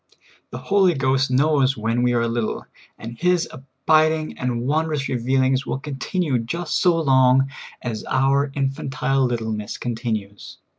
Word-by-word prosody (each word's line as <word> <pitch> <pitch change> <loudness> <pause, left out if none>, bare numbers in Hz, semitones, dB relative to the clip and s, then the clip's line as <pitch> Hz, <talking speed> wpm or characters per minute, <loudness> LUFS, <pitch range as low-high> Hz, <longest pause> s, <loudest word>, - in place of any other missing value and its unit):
The - - -7
Holy 190 -4 +2
Ghost 135 -1 +1
knows 135 0 +2
when 115 +2 -1
w^e 125 0 +2
are 115 0 +1
little, 115 -1 -2 0.3
and 115 +1 -9
His 180 -1 +2
abiding 155 +4 0
and 125 -2 -2
wondrous 150 0 0
revealings 130 +2 +1
will - - -2
continue 140 +1 -2
just 155 +8 -2
vSo 165 -3 +3
long 130 0 +4 0.3
as 115 -3 -4
our 135 +2 +1
infantile 135 -1 -1
littleness 110 -4 -3
continues. 110 -4 -5
135 Hz, 135 wpm, -22 LUFS, 120-150 Hz, 0.3 s, long